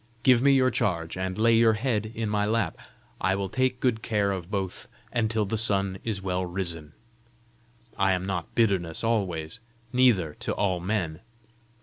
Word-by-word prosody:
Give 125 -2 +5
me 140 +1 +5
your 130 -1 +4
charge, 85 -7 -1
and 95 0 -3
lay 115 +1 +4
your 115 0 +5
head 110 -2 -1
in 115 -1 -2
my 105 0 0
lap; 110 -6 0 0.4
I 95 +1 +1
will 100 -1 -3
take 130 +2 0
good 120 -4 +1
care 105 -3 0
of 90 -2 -5
both 95 -3 -4 0.3
until 110 -2 +1
the 110 +2 0
sun 100 -4 +1
is 105 -4 -3
well 90 -1 -1
risen. 85 -4 -4 1.1
I 95 0 +3
am 90 0 -2
not 90 -3 -4
bitterness 95 -8 +1
always, 95 -5 -1 0.3
neither 115 -12 +3
to - - -2
all 95 -3 0
men!" 85 -4 -2
100 Hz, 165 wpm, -26 LUFS, 90-115 Hz, 1.1 s, Give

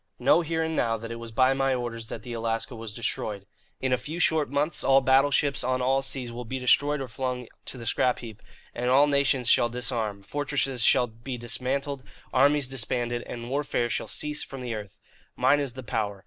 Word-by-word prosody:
Know 170 - +4
here 165 0 -1
and 160 0 -2
now 115 -5 +1
that 115 +1 -7
it 115 - -5
was 115 -1 -8
by 130 +4 +4
my 135 -1 +1
orders 115 -2 -4
that 115 - -7
the 120 - -6
Alaska 115 +2 -2
was 115 -1 -7
destroyed. 105 -3 -3 0.3
In 130 -1 0
a 125 - +2
few 150 +7 -6
short 160 -3 +3
months, 145 +3 0
all 135 0 +6
battleships 135 +1 +3
on 130 0 0
all 135 +2 +2
seas 130 -3 -4
will 120 +1 -6
be 130 +3 -4
destroyed 145 +3 +3
or 135 - -4
flung 125 -1 -3 0.2
to - - -6
the 115 - -8
scrap 125 +2 +2
heap, 110 -3 -10 0.3
and 125 +1 -1
all 135 +3 +6
nations 140 -3 +2
shall 120 - +5
disarm; 115 -4 -2
fortresses 135 +1 -1
shall 125 +1 +5
be 120 +3 -7
dismantled, 130 +4 -3 0.3
armies 140 +1 +4
disbanded, 120 -1 -1
and 120 0 -6
warfare 135 -4 0
shall - - -2
cease 150 0 -2
from 135 -1 -8
the 120 -2 -3
earth. 105 -3 -7 0.4
Mine 145 - +4
is 140 -4 -2
the 130 +1 -8
power. 110 -4 -2
125 Hz, 205 wpm, -27 LUFS, 115-135 Hz, 0.4 s, all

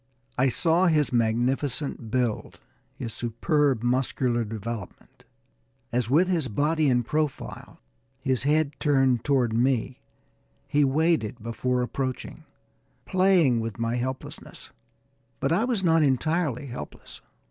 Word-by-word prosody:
I 130 +2 +3
saw 170 +8 +2
his 150 -5 +2
magnificent 120 +2 0
build, 120 -2 -2 0.4
his 115 - -6
superb 125 +2 0
muscular 125 -1 0
development, 110 -1 -7 0.7
as 120 -1 0
with 165 +7 +4
his 170 -7 0
body 150 +6 +1
in 125 -1 +2
profile, 150 +3 -3 0.4
his 130 -3 0
head 150 +2 +2
turned 135 -5 +2
toward 130 -6 +1
me, 125 +2 0 0.7
he 145 0 +2
waited 140 -6 +1
before 125 +2 -1
approaching, 130 +1 -4 0.6
playing 185 -10 +3
with 115 -3 -4
my 115 +1 -1
helplessness; 130 +2 -6 0.7
but - - 0
I 195 +8 +2
was 235 -6 -1
not 165 -2 +4
entirely 145 0 +1
helpless! 120 - -9
130 Hz, 115 wpm, -26 LUFS, 120-150 Hz, 0.7 s, with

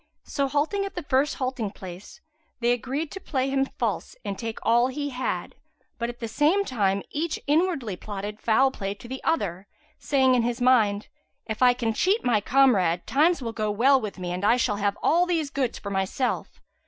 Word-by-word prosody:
So 280 -2 -1
halting 300 +9 0
at 395 - -6
the 350 - -4
first 275 +1 +1
halting 255 -6 -3
place 185 +1 -10 0.4
they 240 0 +2
agreed 265 +6 -2
to 385 - -6
play 270 -6 -1
him 270 0 +1
false 230 -7 -2
and 200 -1 -2
take 225 +1 -5
all 240 +2 +4
he 285 +2 -4
had; 255 0 -3 0.5
but 235 0 -1
at 240 0 -8
the 230 - -4
same 300 - +2
time, 200 - 0
each 315 +2 -2
inwardly 295 - +1
plotted 205 +1 -6
foul 265 +4 +3
play 200 -5 -4
to 240 - -12
the 265 +2 -7
other, 195 - -1 0.3
saying 265 -2 +3
in 250 - +3
his 240 +1 -1
mind, 220 -5 +3 0.4
"If 220 +1 -5
I 250 -1 +6
can 230 -3 -1
cheat 390 - +1
my 230 -4 +3
comrade, 200 -10 +3
times 310 +1 +2
will 230 -1 -4
go 215 -2 -1
well 255 +6 +4
with 210 -3 -5
me 180 -1 -4
and 180 +2 -4
I 230 +4 +4
shall 225 -4 0
have 205 0 0
all 350 +3 +3
these 320 -5 -1
goods 265 -4 -1
for 200 - -6
myself." 195 +7 -2
245 Hz, 200 wpm, -25 LUFS, 210-280 Hz, 0.5 s, I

